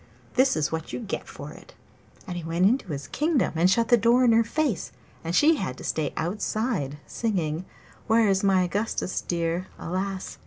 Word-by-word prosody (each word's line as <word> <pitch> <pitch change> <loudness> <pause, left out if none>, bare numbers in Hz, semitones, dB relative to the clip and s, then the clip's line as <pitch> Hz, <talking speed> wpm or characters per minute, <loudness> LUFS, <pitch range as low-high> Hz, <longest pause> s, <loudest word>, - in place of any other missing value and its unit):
This 260 +1 +3
is 150 -1 0
what 160 0 -4
you - - -4
get 220 -5 -5
for - - -9
it!' - - -15 0.5
And 180 - -5
he 175 - -5
went 165 +3 +1
into 240 +2 +2
his 140 -2 -4
kingdom 300 - +1
and 170 +3 +4
shut 230 +4 +2
the 240 - +7
door 235 +3 +4
in 235 - +5
her 230 +1 +5
face, 260 - -1 0.3
and 165 +1 -2
she 310 +6 +5
had 130 - -3
to - - -10
stay 155 -2 -1
outside 185 - -2
singing 180 -7 -2 0.4
'Where's 215 -4 +3
my 190 -2 +4
Augustus 195 +1 -2
dear? 170 +1 -2
Alas! 190 +2 -4
190 Hz, 185 wpm, -26 LUFS, 165-230 Hz, 0.5 s, the